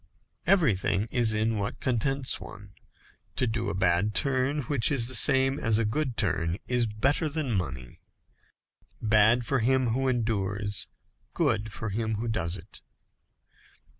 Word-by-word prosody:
Everything 105 - +2
is 120 -3 +2
in 110 0 0
what 100 - -4
contents 130 +2 -1
one. 100 0 -10 0.6
To 130 - +1
do 115 0 -2
a - - -3
bad 95 +2 +1
turn, 140 +2 0
which 120 -2 0
is 125 -5 +2
the 130 - -3
same 135 +3 +4
as 110 -1 +1
a 115 - +1
good 130 +2 -2
turn, 85 -4 0
is 125 -2 +1
better 135 +9 0
than 150 -3 -3
money. 65 - -4 1.0
Bad 110 +2 +4
for 135 +1 +1
him 130 +1 +2
who 130 +4 0
endures, 105 -4 -1 0.5
good 110 -9 0
for 110 0 -4
him 110 +2 -2
who 115 +3 -4
does 90 -5 -1
it. - - -13
115 Hz, 145 wpm, -27 LUFS, 105-130 Hz, 1.0 s, same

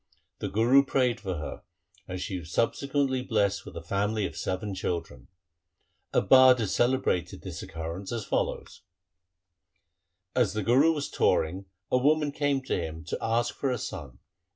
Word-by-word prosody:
The - - -3
Guru 120 +6 +5
prayed 130 -4 +1
for 95 -3 -4
her 75 - -6 0.5
and 90 0 -5
she 95 0 -3
was 80 0 -11
sub 115 - +2
sequently 140 -2 0
blessed 100 -5 0
with - - -8
a 85 - -7
family 100 +4 0
of - - -5
seven 95 +2 -3
children. 85 -9 -4 0.8
A - - +3
bard 130 +5 +7
has 110 -5 -1
celebrated 120 -8 0
this - - -6
occurrence 85 +4 -6
as 115 -4 -3
follows: - - -2 0.8
— 90 +1 -52
As 120 -6 +2
the 105 -1 -2
Guru 130 +10 +5
was 145 -2 -3
touring, 95 +5 +1 0.3
a 125 - +4
woman 150 +2 +2
came 140 -2 0
to - - -1
him 80 -1 -6
to - - -1
ask 120 +1 +1
for 140 - -2
a 125 - 0
son. 70 - -7
105 Hz, 170 wpm, -28 LUFS, 90-130 Hz, 0.8 s, bard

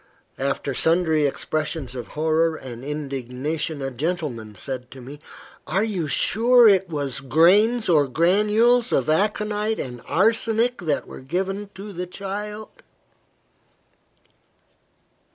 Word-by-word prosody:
After 140 0 -2
sundry 160 0 +2
expressions 155 -2 -3
of 125 -2 -6
horror 160 +1 +2
and 125 -4 -9
indignation, 145 +1 -4
a 135 - -3
gentleman 130 - -4
said 125 +5 -6
to 135 - -12
me 135 +4 -10 0.5
"Are 195 +3 +1
you 190 -8 -2
sure 235 - +4
it 195 -3 +4
was 145 -5 -3
grains 195 - +4
or 150 -5 +4
granules 210 - +3
of 135 +3 +1
aconite 210 +4 0
and 125 -2 -6
arsenic 225 +4 +1
that 155 -6 -1
were - - -10
given 195 +8 -3
to 200 +1 -8
the 180 0 -5
child?" 210 - -7
165 Hz, 115 wpm, -23 LUFS, 140-210 Hz, 0.5 s, sure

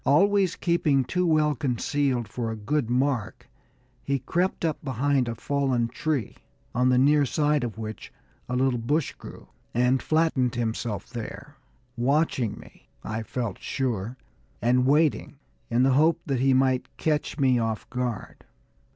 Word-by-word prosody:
Always 195 +4 +3
keeping 155 -6 +2
too 180 +4 0
well 155 -2 +3
concealed 130 -1 -1
for 115 +1 -4
a 110 - -3
good 115 +4 -1
mark, 125 -3 -1 0.5
he 140 0 0
crept 170 +7 -1
up 155 -2 -2
behind 135 0 +1
a 115 - -3
fallen 130 -2 0
tree, 145 -3 -2 0.4
on 125 +1 +2
the 125 - +4
near 145 +3 +5
side 150 +1 +1
of 115 -3 -4
which 110 -1 -7 0.4
a 125 - -1
little 130 -1 +1
bush 145 +6 0
grew, - - -12 0.3
and 125 +2 +3
flattened 155 -6 +1
himself 115 -1 -3
there, 130 +4 -7 0.4
watching 130 -2 +1
me, - - -16
I 110 +1 -3
felt 115 -3 -4
sure, 120 -3 -3 0.4
and 125 +2 +2
waiting, 150 +2 +2 0.3
in 120 +2 +2
the 135 - +4
hope 160 +4 +4
that 135 -4 -1
he 135 +1 +3
might 130 -1 +2
catch 150 -1 -1
me 130 -4 +3
off 115 -2 -2
my - - -17
guard. 120 -4 -4
130 Hz, 150 wpm, -26 LUFS, 120-150 Hz, 0.5 s, near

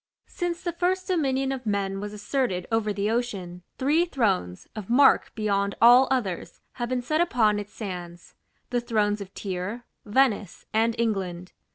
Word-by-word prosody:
Since 350 -1 -4
the 345 - -1
first 365 +2 0
dominion 270 -7 0
of 260 -3 -5
men 195 -1 -1
was 205 +1 -5
asserted 210 -3 -1
over 225 -2 +1
the 205 +1 -1
ocean, 195 -7 -3 0.2
three 300 +6 +3
thrones, 195 - -1
of 215 -2 -7
mark 270 +4 +5
beyond 200 -2 0
all 245 +3 +7
others, 215 -10 -2
have 240 -1 -4
been 255 -1 -1
set 310 +6 +1
upon 220 -10 +2
its 205 0 -7
sands: 175 -4 -7 0.4
the 245 -1 +1
thrones 210 -3 0
of 195 -1 -8
Tyre, 200 +5 -4 0.2
Venice, 210 -4 +1
and 225 +1 +2
England. 190 -6 -2
220 Hz, 160 wpm, -26 LUFS, 200-260 Hz, 0.4 s, all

